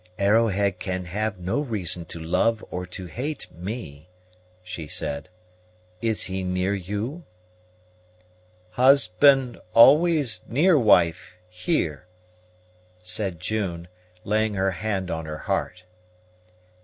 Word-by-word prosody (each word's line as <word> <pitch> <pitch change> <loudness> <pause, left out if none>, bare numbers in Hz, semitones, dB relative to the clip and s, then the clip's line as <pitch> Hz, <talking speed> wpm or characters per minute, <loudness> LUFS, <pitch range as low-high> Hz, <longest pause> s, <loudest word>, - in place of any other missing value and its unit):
"Arrowhead 100 -2 +2
can 90 -1 -3
have 105 +3 -3
no 90 +9 -2
reason 100 - -3
to 85 - -7
love 105 +7 0
or 90 0 -4
to 90 +1 -7
hate 135 - -4
me," 85 - -7 0.5
she 90 -4 -7
said. 70 +3 -3 0.7
"Is 110 -2 0
he 95 0 -3
near 90 +1 0
you?" 105 - -4 1.5
"Husband 135 +1 +4 0.2
always 145 0 +5
near 160 +9 +3
wife, 90 - +3
here," 90 - -2 1.0
said 90 -1 -3
June, 90 -4 -3 0.4
laying 110 0 0
her 95 0 +1
hand 95 0 -3
on 80 -1 -4
her 75 0 -5
heart. 90 +4 -3
95 Hz, 105 wpm, -24 LUFS, 90-115 Hz, 1.5 s, always